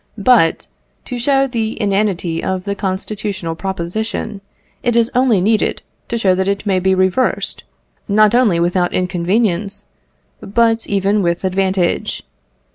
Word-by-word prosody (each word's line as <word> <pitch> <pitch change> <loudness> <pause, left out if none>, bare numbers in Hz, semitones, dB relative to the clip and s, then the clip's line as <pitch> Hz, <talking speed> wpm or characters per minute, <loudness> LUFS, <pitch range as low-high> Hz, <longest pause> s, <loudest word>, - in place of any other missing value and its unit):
But 210 -6 +3 0.4
to 250 -2 -5
show 270 +2 +2
the 230 -4 -3
inanity 195 -5 0
of 185 -1 -2
the 200 - -2
constitutional 195 -2 -3
proposition, 195 +3 -4 0.4
it 240 -1 0
is 235 0 +2
only 250 -5 +3
needed 215 +3 +1 0.2
to 235 - -2
show 195 -5 +3
that 190 +1 -1
it 200 +1 -1
may 190 -2 +2
be 190 +1 +2
reversed, 185 +7 0 0.4
not 215 +1 +4
only 230 -9 +3
without 175 +1 +1
inconvenience, 190 +2 -1 0.5
but 225 +2 +1
even 200 +1 +1
with 170 0 -1
advantage. 190 -1 0
200 Hz, 130 wpm, -17 LUFS, 185-220 Hz, 0.5 s, not